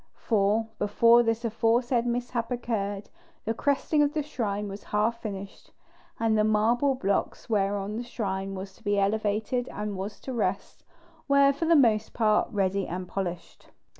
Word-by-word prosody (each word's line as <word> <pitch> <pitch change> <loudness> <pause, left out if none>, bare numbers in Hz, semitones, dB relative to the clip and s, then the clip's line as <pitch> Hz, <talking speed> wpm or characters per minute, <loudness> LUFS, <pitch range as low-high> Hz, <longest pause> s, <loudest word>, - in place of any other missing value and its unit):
For 215 0 +1
before 230 +3 +5
this 225 0 -1
aforesaid 235 +2 +1
mishap 240 -1 -2
occurred, 210 -5 -3 0.3
the 225 - 0
cresting 285 +4 +1
of 290 +1 +1
the 305 - 0
shrine 210 -8 -3
was 200 +1 -8
half 220 +3 0
finished, 200 -2 -7 0.5
and 225 -1 +2
the 215 - +3
marble 230 +6 +2
blocks 200 +1 -2
whereon 200 0 0
the 240 - -3
shrine 195 -5 -3
was 190 0 -7
to - - -23
be 205 -1 +1
elevated 215 +4 0
and 210 -1 -4
was 195 +2 -6
to 265 - -6
rest, 235 - -2 0.4
were 280 0 +5
for 285 +4 -3
the 335 +1 +5
most 220 -7 +3
part 215 -2 +2
ready 195 -2 0
and 180 +1 -5
polished. 180 -3 -6
220 Hz, 160 wpm, -27 LUFS, 200-240 Hz, 0.5 s, before